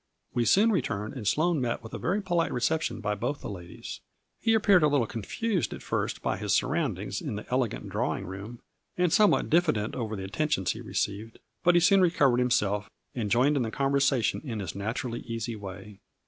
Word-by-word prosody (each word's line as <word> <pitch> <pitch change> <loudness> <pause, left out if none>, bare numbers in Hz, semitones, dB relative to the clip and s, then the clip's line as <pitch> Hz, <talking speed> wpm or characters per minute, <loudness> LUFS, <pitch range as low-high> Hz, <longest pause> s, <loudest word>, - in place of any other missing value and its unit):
We 120 - +1
soon 215 - +5
returned 105 - -1
and 120 -7 -5
Sloane 155 - +2
met 120 -1 -2
with 115 - -10
a - - -4
very 200 +4 0
polite 175 -3 +1
reception 125 -2 0
by 105 0 0
both 120 +8 -2
of - - -23
the - - -4
ladies. 90 -3 -8 0.4
He 225 -1 +3
appeared 200 -4 +5
a 150 - +5
little 140 -5 +2
confused 175 - -2
at - - -11
first - - -2
by - - 0
his - - -1
surroundings - - -1
in - - -4
the 105 - -6
elegant 125 -3 -1
drawing - - -2
room, 100 +6 -8 0.4
and 180 -2 +2
somewhat 210 -1 +4
diffident 155 -11 +2
over 110 -3 -3
the 95 - -5
attentions 95 - 0
he - - -6
re - - -10
ceived, 105 +3 -2 0.3
but 175 0 +5
he - - +7
soon 195 +2 +5
recovered 140 -8 +3
himself 105 -5 +1 0.2
and 110 -5 -2
joined 130 +7 +3
in 140 - +1
the 115 - -1
conversation 135 -2 +1
in 115 -7 -4
his 95 -5 -4
naturally 115 +4 -3
easy 115 0 -4
way. 100 0 -9
120 Hz, 205 wpm, -28 LUFS, 105-155 Hz, 0.4 s, he